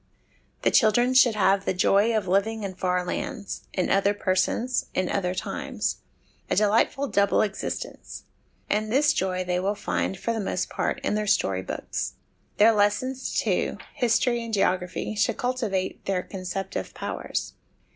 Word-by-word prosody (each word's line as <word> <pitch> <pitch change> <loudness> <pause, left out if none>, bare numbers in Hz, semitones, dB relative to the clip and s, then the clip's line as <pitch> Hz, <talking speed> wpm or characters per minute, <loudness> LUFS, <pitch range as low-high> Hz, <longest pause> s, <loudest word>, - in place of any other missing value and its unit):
The - - +3
children 240 +3 +4
should 250 -3 +6
have 195 -1 +3
the 190 - -1
joy 205 +5 +3
of 215 - -2
living 210 +4 +1
in 195 -1 -4
far 180 -1 -1
lands, 200 +3 -5
in 185 - -1
other 200 +1 +3
persons, 205 +6 0
in 185 -1 0
other 185 -2 -1
times 185 - -3 0.5
a - - +1
delightful 225 +7 +2
double 200 -4 +3
exist 205 -2 -3
ence; - - -11 0.4
and 215 +1 0
this 290 +4 +4
joy 185 -1 -1
they 180 0 -1
will 195 +3 0
find, 195 - -2
for 230 +5 -2
the 225 - -2
most 200 - -2
part, - - -1
in - - 0
their 210 0 -1
story 95 - +2
books. - - -4 0.4
Their 220 +2 +7
lessons, 220 +5 0
too, - - 0 0.2
history 240 -1 +1
and 230 - -6
geography, 185 -1 0
should 215 +2 +1
cultivate 225 -7 -2
their 185 -2 0
conceptive 190 0 -5
powers. - - -4
205 Hz, 155 wpm, -26 LUFS, 185-225 Hz, 0.5 s, Their